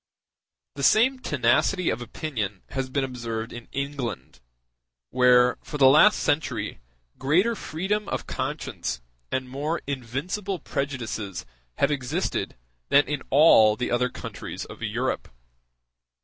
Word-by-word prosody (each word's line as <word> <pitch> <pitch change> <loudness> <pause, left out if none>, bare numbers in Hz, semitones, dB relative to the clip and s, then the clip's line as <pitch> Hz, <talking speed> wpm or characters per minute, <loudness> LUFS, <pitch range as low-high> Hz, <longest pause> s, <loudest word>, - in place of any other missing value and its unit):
The 140 - -7
same 235 - +4
tenacity 150 - +2
of 115 - -3
opinion 115 - -4
has 135 -1 -3
been 140 +1 0
observed 115 -3 -4
in 120 0 -9
England, 135 - -4 0.7
where, 125 -1 +5
for 150 - -6
the 140 - +5
last 155 +10 +7
century, 145 +2 -1 0.4
greater 175 +12 +3
freedom 200 +4 -2
of - - -3
conscience - - -4 0.3
and 130 0 -1
more 145 +6 -2
invincible 145 - -3
prejudices 120 - -4 0.3
have 140 - +2
existed 135 -4 -2 0.3
than 145 +1 +6
in 145 -2 -2
all 120 -8 +6
the 125 +2 -3
other 125 +1 +2
countries - - -7
of - - -12
Europe. - - -2
135 Hz, 120 wpm, -25 LUFS, 120-155 Hz, 0.7 s, last